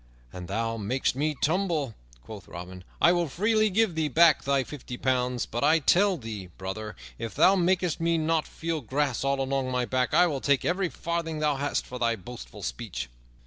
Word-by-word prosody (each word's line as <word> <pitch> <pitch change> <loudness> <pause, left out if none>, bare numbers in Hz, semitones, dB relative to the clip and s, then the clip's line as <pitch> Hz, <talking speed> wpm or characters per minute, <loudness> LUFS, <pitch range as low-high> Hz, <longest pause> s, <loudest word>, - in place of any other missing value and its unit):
"An 90 -1 -7
thou 115 +4 -2
makest 120 +5 -1
me 150 +2 0
tumble," 160 - 0 0.3
quoth 105 - -10
Robin, 90 +1 -9 0.2
"I 170 - +6
will 175 -1 +1
freely 215 +8 +2
give 210 -1 +2
thee 160 -1 0
back 160 +3 +5
thy 140 -1 +2
fifty 130 -3 -8
pounds; 125 -1 0
but 120 - -4
I 155 +3 +5
tell 185 +5 +3
thee, 110 - -7
brother, 100 +3 -5 0.2
if 115 -1 -5
thou 190 - +6
makest 180 -2 +1
me 165 0 +2
not 160 0 0
feel 165 -2 -3
grass 135 +1 -1
all 140 0 +1
along 135 -1 -1
my 125 -1 0
back, 125 -2 0
I 180 - +6
will 145 -6 -2
take 140 -3 +2
every 180 +1 +1
farthing 170 -2 -3
thou 150 -2 +1
hast 145 +1 -1
for 125 - -7
thy 115 -1 +2
boastful 115 +4 -10
speech." - - -5
140 Hz, 190 wpm, -27 LUFS, 120-165 Hz, 0.3 s, I